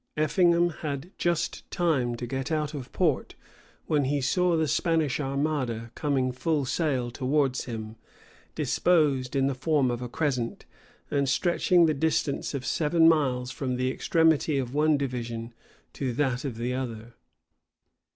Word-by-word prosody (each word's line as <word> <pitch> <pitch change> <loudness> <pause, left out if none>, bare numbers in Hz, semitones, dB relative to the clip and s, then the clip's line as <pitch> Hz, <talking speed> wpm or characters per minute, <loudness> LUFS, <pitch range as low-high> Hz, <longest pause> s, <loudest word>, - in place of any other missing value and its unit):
Effingham 170 +3 +3
had 145 +3 -4
just 170 -2 -1
time 140 -9 0
to 120 - -5
get 135 +4 -4
out 150 -1 -1
of 140 -3 -7
port, 160 -7 0 0.5
when 150 -3 +1
he 145 +2 0
saw 170 +6 +2
the 160 -1 +1
Spanish 155 -1 +1
armada 135 -5 -2
coming 135 -4 0
full 145 +2 -1
sail 130 -4 -1
towards 135 +1 0
him, 110 -2 -6 0.6
disposed 145 -7 +1
in 135 -1 +2
the 140 - +1
form 135 -1 +1
of 120 0 -4
a 125 - -5
crescent, 125 -5 -2 0.5
and 140 -2 +1
stretching 175 +3 +3
the 155 - +2
distance 150 -1 -1
of 130 -2 -4
seven 160 +4 +3
miles 130 -6 +2
from 130 -1 -3
the 130 +1 0
extremity 160 -1 +2
of 130 -2 -3
one 150 +1 +3
division 120 -4 -4 0.4
to 130 -3 -3
that 130 0 -1
of 125 -5 -4
the 120 +2 -2
other. 120 -3 -5
140 Hz, 150 wpm, -27 LUFS, 125-155 Hz, 0.6 s, Effingham